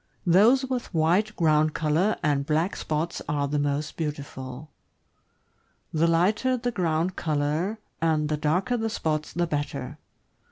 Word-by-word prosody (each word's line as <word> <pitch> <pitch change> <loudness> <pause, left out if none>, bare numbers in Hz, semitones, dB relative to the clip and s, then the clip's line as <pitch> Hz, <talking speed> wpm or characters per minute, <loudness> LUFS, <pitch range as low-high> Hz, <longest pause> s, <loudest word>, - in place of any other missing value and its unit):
Those 220 +10 +5
with 255 -7 -4
white 180 +7 +2
ground 155 -2 +2
color 165 +7 +2
and 145 -3 +2
black 160 +6 0
spots 160 +2 -2
are 145 -1 0
the 145 +1 -1
most 145 +1 -2
beautiful; 140 -2 -6 1.2
the 160 +1 +3
lighter 210 +10 +2
the 245 0 -2
ground 175 -2 0
color 155 +7 -1 0.2
and 155 -2 +2
the 155 - 0
darker 180 +12 +1
the 225 -1 -1
spots, 155 -7 -2
the 175 0 0
better. 145 -2 -4
160 Hz, 135 wpm, -26 LUFS, 150-185 Hz, 1.2 s, Those